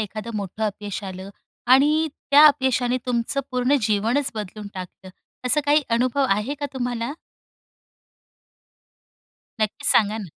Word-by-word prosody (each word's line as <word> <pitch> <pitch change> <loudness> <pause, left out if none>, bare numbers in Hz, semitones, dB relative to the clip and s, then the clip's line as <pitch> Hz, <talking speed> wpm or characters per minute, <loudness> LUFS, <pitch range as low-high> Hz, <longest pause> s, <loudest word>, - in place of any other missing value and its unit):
एखादं 215 +2 -5
मोठं 205 +2 -4
अपयश 205 0 -5
आलं? 190 0 -8 0.4
आणि 295 +5 +4 0.2
त्या 290 +2 +8
अपयशाने 260 -4 +2
तुमचं 245 +3 -1
पूर्ण 255 +2 +2
जीवनच 225 +6 +1
बदलून 210 0 -7
टाकलं? 185 0 -9 0.4
असं 285 +4 +3
काही 295 +1 +4
अनुभव 255 +4 +1
आहे 210 +8 0
का 285 - -1
तुम्हाला? 245 0 -3 2.5
नक्कीच, 215 -1 -2
सांगा 215 0 +3
ना. 215 - -6
235 Hz, 120 wpm, -23 LUFS, 210-270 Hz, 2.5 s, त्या